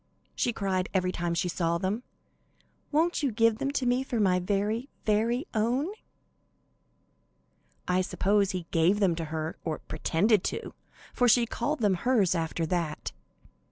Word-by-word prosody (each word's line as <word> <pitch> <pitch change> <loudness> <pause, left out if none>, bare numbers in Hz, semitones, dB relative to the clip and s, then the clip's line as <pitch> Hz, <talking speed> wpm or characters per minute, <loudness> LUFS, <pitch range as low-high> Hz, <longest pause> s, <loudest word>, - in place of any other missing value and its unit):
she 245 - 0
cried 190 -4 -1
every 185 -1 +2
time 170 -1 -2
she 180 +2 0
saw 170 -1 0
them. 190 +6 -2 0.9
"Won't 325 +3 +2
you 280 -4 +1
give 225 0 +2
them 275 - -1
to 270 - 0
me 245 +1 +2
for 245 -3 -2
my 185 -3 +3
very, 205 +7 -1 0.2
very 230 +6 +1
own?" 245 - +1 2.0
I 180 +1 +2
suppose 200 +2 +1
he 180 -2 -3
gave 175 +5 +3
them 190 -4 +3
to 165 0 -4
her, 155 +1 -4
or 160 -2 -2
pretended 190 +6 +1
to, - - -4 0.4
for 245 - +3
she 240 0 +5
called 245 +5 -2
them 205 -3 +3
hers 205 -1 +2
after 165 -1 -1
that. 165 -2 -2
200 Hz, 155 wpm, -28 LUFS, 175-235 Hz, 2.0 s, she